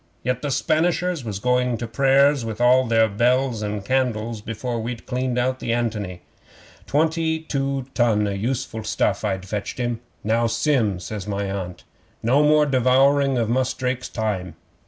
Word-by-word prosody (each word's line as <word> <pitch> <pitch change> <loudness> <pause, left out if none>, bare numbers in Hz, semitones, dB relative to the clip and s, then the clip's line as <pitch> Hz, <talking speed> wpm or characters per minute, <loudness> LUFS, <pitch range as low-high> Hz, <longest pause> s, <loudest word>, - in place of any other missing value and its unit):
Yet 125 0 -1
the 145 - -2
Spanishers 165 +3 0
was 105 -4 -4
going 125 +1 +1
to 120 - -4
prayers 135 +3 +3
with 110 -2 -4
their 120 -2 +4
bells 120 +2 +1
and 105 -1 -4
candles 115 -3 -1
before 115 +2 -4
we'd 115 +1 -5
cleaned 125 -1 -2
out 130 +1 0
the 115 - -3
ANTONY. 105 -7 -2 0.7
Twenty 160 +1 +1
two 140 -3 -2
ton 110 -4 +2
o' - - -1
useful 110 +2 -3
stuff 105 -1 0
I'd 95 -2 -2
fetched 105 +1 -4
him. 120 -2 -2 0.2
'"Now, 115 +2 +2
Sim," 115 -4 +1
says 100 +2 -6
my 100 -1 -2
Aunt, 90 -3 -5 0.4
"no 130 +6 +4
more 150 0 +5
devouring 135 +1 +3
of 115 -2 +1
Mus' 130 +2 0
Drake's 130 0 -3
time. 95 -6 -3
120 Hz, 155 wpm, -22 LUFS, 110-135 Hz, 0.7 s, more